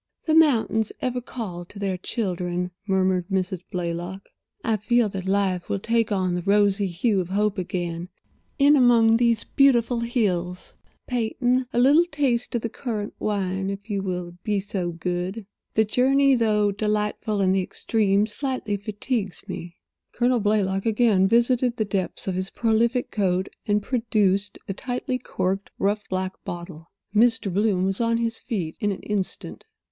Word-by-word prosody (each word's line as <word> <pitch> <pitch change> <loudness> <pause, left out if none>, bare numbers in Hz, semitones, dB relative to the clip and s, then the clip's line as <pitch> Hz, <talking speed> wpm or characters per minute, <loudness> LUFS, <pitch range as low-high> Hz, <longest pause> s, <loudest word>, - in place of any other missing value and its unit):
"The 315 - +1
mountains 235 -8 +3
ever 250 -1 -2
call 210 -8 -6
to 200 - -13
their 195 -2 -1
children," 180 -3 -2 0.2
murmured 185 -2 +1
Mrs. 185 -2 -1
Blaylock. 175 +1 -4 0.3
"I 220 -1 +1
feel 235 +1 +2
that 190 -1 -5
life 190 -2 0
will - - 0
take 230 +2 0
on 185 -3 +1
the 175 - -1
rosy 200 +1 +3
hue 190 +3 +1
of 175 - -6
hope 205 +1 0
again 175 -1 -3 0.5
in 285 +1 +6
among 235 -4 +5
these 235 -2 +2
beautiful 245 -4 +3
hills. 185 -7 -1 0.3
Peyton—a 250 +1 0
little 285 +7 +6
taste 270 -8 -1
of 235 - -1
the - - 0
currant 215 -4 -4
wine, 195 -2 -1
if 200 +2 -6
you 200 -1 0
will 180 -2 -4
be 210 -2 0
so 190 -3 -3
good. 180 +5 -3 0.3
The 220 - +4
journey, 270 +5 +3
though 210 -4 +2
delightful 210 +1 -1
in 190 -1 +3
the 190 0 +2
extreme, 200 +1 +1
slightly 225 -2 -3
fatigues 210 -1 -3
me." 175 0 -7 0.4
Colonel 245 0 +2
Blaylock 205 -1 +1
again 215 -4 +3
visited 240 +2 +2
the 220 - 0
depths 195 -1 -3
of 190 - 0
his 185 +1 -3
prolific 235 +2 +1
coat, 190 -2 0 0.2
and 205 0 +2
produced 210 -5 +1
a 195 - -2
tightly 250 +3 -3
corked, 195 -4 -2
rough, 205 +1 -1
black 185 0 -3
bottle. 170 -2 -8 0.3
Mr. 225 -3 +3
Bloom 195 -2 +2
was 195 +3 -1
on 230 0 +2
his 230 -1 -2
feet 180 -10 -3
in 210 -3 0
an 195 - -6
instant. 205 -3 -4
205 Hz, 155 wpm, -24 LUFS, 185-235 Hz, 0.5 s, in